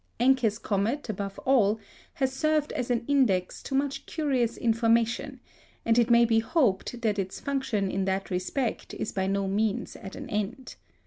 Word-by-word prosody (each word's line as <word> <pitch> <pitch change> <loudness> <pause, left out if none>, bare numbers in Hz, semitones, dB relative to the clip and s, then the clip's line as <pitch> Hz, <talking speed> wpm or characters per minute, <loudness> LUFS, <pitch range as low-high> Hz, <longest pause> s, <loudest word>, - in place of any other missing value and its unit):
Encke's 245 -4 +3
comet, 225 +7 -1
above 195 -1 -4
all, 225 -5 +3 0.4
has 265 -2 0
served 310 +1 +1
as 250 - -3
an 240 -1 0
index 230 -11 +2
to 270 - -4
much 275 0 -1
curious 265 -7 0
information, 230 +3 +1 0.5
and 230 +1 +4
it 235 0 +3
may 235 0 +6
be 225 -1 +3
hoped 235 - 0
that 210 -2 +1
its 190 -1 -3
function 240 -9 -1
in 195 0 -1
that 190 0 -2
respect 200 +7 -2
is - - -3
by 190 -1 -1
no 195 0 0
means 215 +3 -1
at 190 - -9
an 280 - -7
end. 215 +5 -3
230 Hz, 170 wpm, -27 LUFS, 200-265 Hz, 0.5 s, may